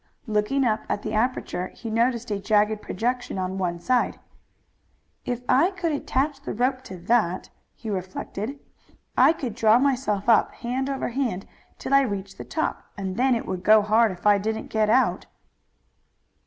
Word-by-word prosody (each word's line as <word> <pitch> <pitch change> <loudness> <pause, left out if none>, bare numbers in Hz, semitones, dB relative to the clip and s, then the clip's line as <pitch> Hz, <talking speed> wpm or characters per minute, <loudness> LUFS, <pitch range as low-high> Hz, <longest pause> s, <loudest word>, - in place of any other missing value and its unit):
Looking 220 +5 +1
up 220 -2 +1
at 205 - -2
the - - -4
aperture 220 -5 -1
he 225 - -6
noticed 235 0 0
a 205 - -1
jagged 210 +1 +2
projection 245 +1 -2
on 185 +1 -3
one 175 -2 -1
side. 250 +7 0 1.1
"If 245 0 -3
I 280 +8 +4
could 350 -4 -2
attach 280 0 -1
the - - -5
rope 255 +3 0
to 190 - -8
that," 185 -1 0 0.2
he 225 - -10
reflected, 200 +5 -4 0.6
"I 265 +4 +6
could 265 -8 -4
draw 225 0 +4
myself 250 -7 0
up 230 - +4
hand 255 +3 -3
over 270 -1 -2
hand 240 -7 -2 0.3
till 275 - -4
I 275 - +7
reached 200 -6 -4
the - - -5
top, 315 - -2 0.2
and 190 -2 -4
then 255 +1 +3
it 230 - -3
would 185 -1 -4
go 215 +1 +6
hard 220 +1 +3
if 180 +1 -11
I 205 -1 +5
didn't 220 +2 -3
get 215 -1 +2
out." 255 +4 +2
225 Hz, 170 wpm, -25 LUFS, 205-255 Hz, 1.1 s, I